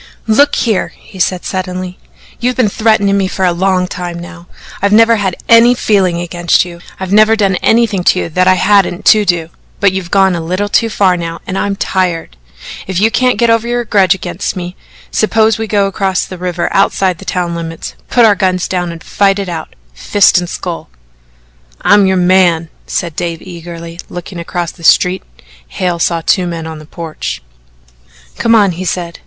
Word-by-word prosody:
"Look 280 +7 +3
here," 220 -5 -1
he 190 - -15
said 180 0 0
suddenly, 185 -1 -4 0.4
"you've 250 +1 0
been 245 -5 +2
threatening 215 -2 +2
me 195 -1 +1
for 190 0 -2
a 180 - +3
long 185 +1 +1
time 175 -1 -6
now. 175 0 -11 0.3
I've 200 +1 +1
never 225 +2 +5
had 190 -4 -1
any 230 +2 +6
feeling 190 -7 +1
against 175 0 +1
you. 170 -1 -10 0.2
I've 190 0 -3
never 215 +1 +5
done 195 -4 +1
anything 225 -5 +1
to 185 - +3
you - - -4
that 180 +3 +1
I 185 - +5
hadn't 195 -1 +2
to 215 -1 0
do. 170 -3 0 0.3
But 200 -2 +3
you've 190 -2 -4
gone 195 -1 +3
a 170 - -3
little 185 +5 -2
too 225 +2 +2
far 195 -4 +2
now 170 -1 -5
and 185 - -5
I'm 200 +1 -1
tired. 180 - -2 0.5
If 185 -2 -2
you 220 +3 +3
can't 250 -2 +1
get 235 +1 +3
over 230 0 +1
your 240 0 -1
grudge 195 -3 +3
against 180 +1 -4
me, 180 0 -6 0.4
suppose 220 0 +2
we 225 - -3
go 205 -2 +1
across 195 -1 -1
the 185 - -9
river 180 -1 -2
outside 190 -3 +1
the - - -10
town 175 -2 -2
limits, 165 -1 -6 0.2
put 240 -2 +4
our 215 - +6
guns 185 -2 0
down 175 -2 -2
and 165 0 -10
fight 200 -1 +1
it 195 -2 -4
out 160 -2 -6 0.2
fist 180 - +3
and 175 -1 -5
skull." 175 - -6 0.9
"I'm 205 -1 +4
your 190 0 +1
man," 175 -3 +3 0.2
said 170 -4 -3
Dave 170 -1 -4
eagerly. 170 -1 -9
Looking 175 0 -8
across 170 0 -4
the 170 - -17
street 180 +3 +3 0.5
Hale 175 - -2
saw 165 0 0
two 185 -3 +2
men 165 -2 -5
on 160 -1 -7
the 155 - -13
porch. 165 - -6 1.0
"Come 230 0 +3
on!" 205 -4 +4
he 175 +2 -6
said. 170 -1 -4
185 Hz, 195 wpm, -13 LUFS, 175-205 Hz, 1.0 s, any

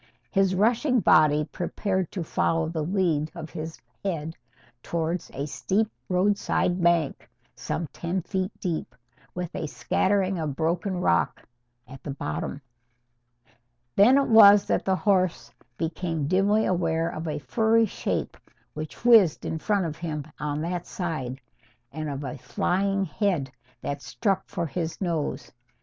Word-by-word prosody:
His 195 -2 +2
rushing 240 +6 +3
body 155 -5 +5
prepared 190 +1 -2
to 180 - -3
follow 165 0 0
the 160 -1 -3
lead 165 -4 +1
of 155 - -7
his 160 +1 -6 0.2
head 165 -4 -3 0.5
towards 170 +3 -2
a 140 +1 -4
steep 205 +8 0 0.2
roadside 185 -1 +1
bank 170 -4 +1 0.3
some 170 - -3
ten 175 +1 -2
feet 190 0 -2
deep, 160 -8 -3 0.4
with 180 -1 -4
a 160 - -3
scattering 190 +3 0
of 150 -4 -2
broken 175 +4 -1
rock 85 - +1 0.4
at 135 +1 -11
the - - -7
bottom. 140 0 -4 1.3
Then 240 +7 +6
it 280 - +3
was 205 -3 +8
that - - 0
the 190 - +2
horse 185 -3 +1 0.3
became 165 -2 -2
dimly 200 +5 +3
aware 165 -2 +1
of 160 +2 -5
a 150 -1 -2
furry 220 - +2
shape 210 - -3 0.4
which 155 +8 -8
whizzed 220 -10 +6
in 160 - -2
front 200 +1 +1
of 155 -1 -4
him 155 -4 -4
on 150 +1 -2
that 175 +1 -3
side, 145 -8 -4 0.5
and 155 +1 -4
of 140 0 -4
a 130 -3 -5
flying 195 +1 0
head 165 - -1 0.3
that 140 0 -4
struck 195 +1 -1
for 170 - -3
his 165 +1 -4
nose. 170 -5 -2
170 Hz, 140 wpm, -26 LUFS, 155-195 Hz, 1.3 s, was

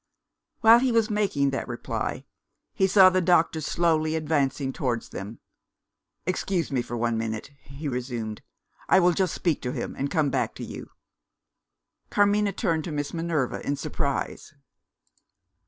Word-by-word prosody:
While 225 +1 +8
he 255 0 +1
was 225 -1 +2
making 190 -10 +1
that 135 - -3
reply, 120 -2 -4 0.5
he 190 - +2
saw 190 -1 +7
the 185 0 +2
doctor 165 -2 +3
slowly 155 0 +1
advancing 145 -3 0
towards 120 -4 -2
them. 105 +4 -7 0.9
"Excuse 185 -2 -1
me 130 -3 +1
for 120 0 -5
one 115 -1 0
minute," 110 +4 -4
he 140 +2 -8
resumed; 120 -4 -4 0.5
"I - - +6
will 180 -1 +5
just 185 -1 0
speak 170 -5 0
to 125 0 -3
him, - - -4
and 140 +1 -2
come 150 -4 +1
back 125 -4 -1
to - - -7
you." - - -8 1.2
Carmina 205 0 +3
turned 170 -6 -1
to 170 - -4
Miss 145 -1 -3
Minerva 165 -6 -1
in 145 - -1
surprise. 145 0 -3
155 Hz, 150 wpm, -26 LUFS, 135-185 Hz, 1.2 s, While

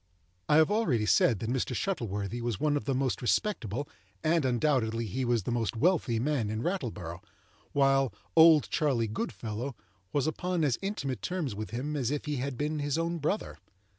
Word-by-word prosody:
I - - +5
have 160 +5 +5
already 160 - +2
said 105 +3 +4
that 110 +4 -4
Mr. 130 -1 -1
Shuttleworthy 115 - -2
was 115 -5 -2
one 150 -1 +2
of 145 - -2
the 135 - 0
most 130 -1 0
respectable 130 - 0 0.4
and, 160 -2 +2
undoubtedly, 120 -3 +1
he 120 +6 -3
was 120 -4 +1
the 120 - -3
most 115 -1 -1
wealthy 140 -4 +2
man 125 -3 0
in 110 +2 -3
Rattleborough, 110 - -3 0.5
while 135 -2 +3 0.2
"Old 160 -2 +7
Charley 130 -7 +1
Goodfellow" 110 +4 -4 0.4
was 145 -1 +1
upon 175 +2 -1
as 135 -6 +1
intimate 140 - -3
terms 170 - -2
with 105 -1 -5
him 135 +7 -3
as 130 -5 0
if 145 0 -2
he 150 -1 -2
had 130 0 -3
been 150 +1 -1
his 145 +1 -1
own 165 +1 -1
brother. 160 +8 -2
135 Hz, 180 wpm, -30 LUFS, 115-155 Hz, 0.5 s, Old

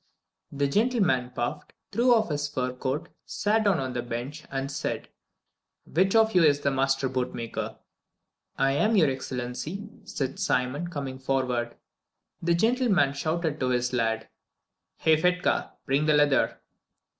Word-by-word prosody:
The 140 0 0
gentleman 195 - +2
puffed, 125 +4 -4 0.2
threw 240 +5 +3
off 220 -6 +1
his 145 0 -1
fur 125 -3 -2
coat, 130 +3 -3
sat 220 +1 0
down 195 -4 +4
on 130 -1 -3
the 120 - -2
bench, 120 +6 -5
and 135 0 -3
said, - - -3 0.8
"Which 190 +6 +1
of 220 0 +5
you 180 -2 +5
is 145 -2 +4
the 140 - +1
master 135 0 +1
bootmaker?" 125 -3 -3 0.8
"I 135 0 +3
am, 215 +11 +2
your 155 -8 +4
Excellency," 130 - -5 0.2
said 135 -1 -3
Simon, 130 +7 0
coming 135 -5 -5
forward. 130 -3 0
Then - - -22 0.7
the 170 0 +2
gentleman 220 - +3
shouted 155 +1 -2
to 130 - 0
his 125 0 0
lad, 115 -2 0 0.7
"Hey, 160 -1 +3
Fedka, 180 +1 +1
bring 140 +3 +1
the 155 - +5
leather!" 145 -2 +3
140 Hz, 145 wpm, -27 LUFS, 130-175 Hz, 0.8 s, of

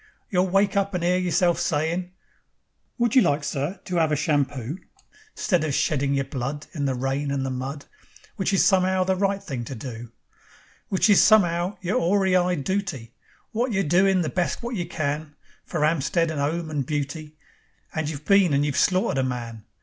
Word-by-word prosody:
You'll 185 -1 +2
wake 195 +2 +2
up 200 -1 0
and 175 - -2
'ear 180 +1 +2
yourself 175 -1 +2
sayin': 165 +4 -1 0.9
'Would 240 -1 +1
you 260 - +8
like, 145 -4 +1
sir, 145 +7 -3
to 180 -2 -1
'ave 160 -2 +2
a - - -3
shampoo?' 145 0 -1 0.6
'Stead 180 -5 +1
of 150 -3 -1
sheddin' 140 -2 +1
yer 135 - +1
blood 135 +2 -5
In 145 -3 -2
the 135 -1 0
rain 135 +3 -2
and 140 -1 -1
the 135 - -2
mud, 135 +3 -5 0.5
Which 190 - -1
is 195 - +3
some'ow 185 -1 +3
the 190 0 +1
right 195 +1 0
thing 130 -5 -4
to 135 - -6
do; 120 -1 -8 0.8
Which 190 +2 +2
is 205 -3 +6
some'ow 180 -3 +3
yer 185 +1 -2
'oary 190 -2 +2
eyed 180 -4 +1
dooty, 190 - -3 0.4
Wot 235 +2 0
you're 195 -1 +1
doin' 185 +4 +3
the 155 - -1
best 175 - -2
wot 240 +1 -4
you 175 -6 -3
can, 150 -2 -3 0.3
For - - -3
'Ampstead 165 +2 +1
and 150 -3 -3
'ome 160 +3 -2
and 145 -3 -1
beauty, 150 +2 -4 0.6
And 155 -2 -2
you've 150 -1 -7
been 195 -5 +4
and 145 +1 +2
you've 140 -2 -2
slaughtered 185 -7 +2
a - - +2
man. 115 -4 -5
160 Hz, 190 wpm, -24 LUFS, 140-185 Hz, 0.9 s, you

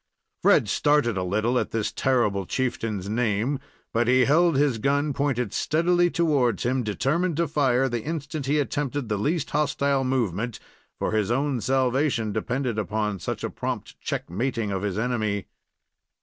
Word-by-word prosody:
Fred - - +4
started 145 -7 +2
a 95 - -1
little 110 +7 +1
at - - -2
this 110 -2 -1
terrible 105 -8 +1
chieftain's 110 -6 -2
name; 115 +4 0 0.3
but 115 0 +2
he 130 0 +5
held 165 +2 +4
his 135 -4 +2
gun 145 +4 +1
pointed 125 -6 -1
steadily 175 +2 +2
towards 145 - +1
him, 130 +2 +1
determined 145 - 0
to 170 0 +1
fire 135 -3 +2
the 120 -2 -2
instant 150 -1 -4
he 145 +2 +2
attempted 145 -3 -2
the 105 - 0
least 150 - -1
hostile 140 -2 +1
movement, 120 -4 -1 0.4
for - - -1
his 110 -2 +1
own 135 0 0
salvation 130 -2 +1
depended 125 -2 -1
upon 105 0 -2
such - - -4
a - - -1
prompt - - -5
check - - -3
mating 115 +3 -2
of 95 -1 -2
his 100 -1 -2
enemy. 110 -4 -1
125 Hz, 160 wpm, -25 LUFS, 110-145 Hz, 0.4 s, he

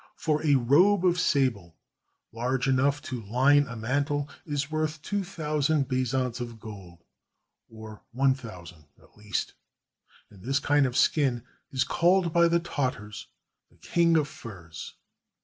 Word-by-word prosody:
For 155 -1 -1
a 145 -3 +4
robe 170 +10 +4
of 180 0 +3
sable, 115 - 0 0.6
large 125 +3 -1
enough 140 +3 +2
to 125 -5 -5
line 135 +7 +3
a 125 - -7
mantle, 145 +5 -1 0.2
is 145 -1 -2
worth 155 0 -2
two 205 -1 -1
thou 155 -5 -3
sand 145 -1 +2
bezants 130 -1 -1
of 120 -2 -7
gold, 95 -6 -11 0.7
or 110 -1 -11
one 135 +2 +3
thousand, 90 - -11
at - - -24
least, 105 -2 -3 0.8
and 100 -3 -16
this 135 +6 0
kind 145 -1 +2
of 125 - -3
skin 130 -6 +2 0.3
is 130 -1 0
called 175 -1 +2
by 170 0 +5
the 170 0 +2
Tartars 125 -10 -4 0.4
"the - - -27
king 170 -1 +2
of 150 -2 +1
furs." 85 - -10
135 Hz, 150 wpm, -27 LUFS, 115-150 Hz, 0.8 s, by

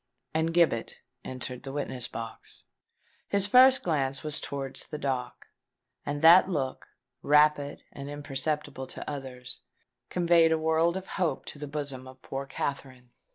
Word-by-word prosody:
And 160 +1 +1
Gibbet 165 -9 +2 0.3
entered 125 -1 -6
the 135 +1 -7
witness 135 -3 -3
box. 115 -1 -9 0.6
His 200 -1 +2
first 255 +5 +6
glance 140 -5 -1
was 155 -1 0
towards 135 -1 -5
the 150 - -5
dock; 130 -4 -4 0.5
and 145 +1 -4
that 175 +3 +8
look, 135 -7 -3 0.3
rapid, 150 -1 +3
and 140 0 -8
imperceptible 145 -1 -3
to - - -9
others, 130 -3 -7 0.5
conveyed 170 -2 +4
a 160 - +3
world 160 +2 +2
of 190 - -6
hope 175 -8 -2
to 145 - -14
the 150 - -5
bosom 140 -3 -5
of 130 0 -13
poor 135 0 -5
Katherine. 130 -3 -5
145 Hz, 145 wpm, -28 LUFS, 130-160 Hz, 0.6 s, that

